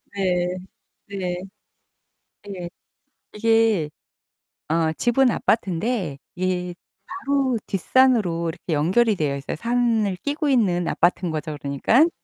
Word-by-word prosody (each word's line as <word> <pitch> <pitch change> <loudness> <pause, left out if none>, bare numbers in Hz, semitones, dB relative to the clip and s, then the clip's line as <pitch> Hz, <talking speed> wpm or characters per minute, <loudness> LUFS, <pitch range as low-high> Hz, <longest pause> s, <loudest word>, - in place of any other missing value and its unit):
네. 180 -2 0 0.5
네. 185 -3 -3 1.1
예. 180 -3 -6 0.6
이게 225 -7 +2 0.8
어 160 0 +1
집은 240 +8 +2
아파트인데 195 - 0 0.2
예 180 -1 -1 0.3
바로 275 -8 0
뒷산으로 195 -5 +2
이렇게 165 +2 -7
연결이 195 +9 +3
되어 145 -4 -1
있어요. 140 - -5
산을 230 -1 +1
끼고 290 +1 -1
있는 185 -9 +2
아파트인 175 0 +1
거죠 155 -1 -4
그러니깐. 225 - +3
190 Hz, 230 characters per minute, -23 LUFS, 170-235 Hz, 1.1 s, 연결이